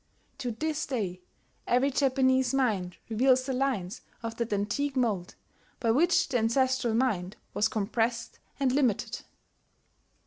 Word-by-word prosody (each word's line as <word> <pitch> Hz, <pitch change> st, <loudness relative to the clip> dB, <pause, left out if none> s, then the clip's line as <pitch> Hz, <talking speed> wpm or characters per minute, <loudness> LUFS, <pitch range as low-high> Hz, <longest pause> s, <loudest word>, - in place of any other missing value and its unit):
To 255 Hz, -3 st, -2 dB
this 310 Hz, +6 st, -2 dB
day 195 Hz, -9 st, -3 dB, 0.5 s
every 255 Hz, +3 st, +3 dB
Japanese 260 Hz, -1 st, +2 dB
mind 205 Hz, -9 st, 0 dB
reveals 255 Hz, +3 st, +3 dB
the 265 Hz, -, -2 dB
lines 250 Hz, -9 st, -1 dB, 0.2 s
of 230 Hz, 0 st, -4 dB
that 235 Hz, -2 st, -2 dB
antique 210 Hz, +8 st, -1 dB
mould 215 Hz, -9 st, -1 dB, 0.4 s
by 230 Hz, -2 st, +2 dB
which 335 Hz, +9 st, +3 dB
the 250 Hz, -3 st, +1 dB
ancestral 245 Hz, +1 st, +1 dB
mind 210 Hz, -7 st, 0 dB, 0.2 s
was 210 Hz, -, +2 dB
compressed 225 Hz, +2 st, -2 dB, 0.2 s
and 270 Hz, -2 st, +2 dB
limited. 255 Hz, -6 st, 0 dB
245 Hz, 130 wpm, -29 LUFS, 215-265 Hz, 0.5 s, every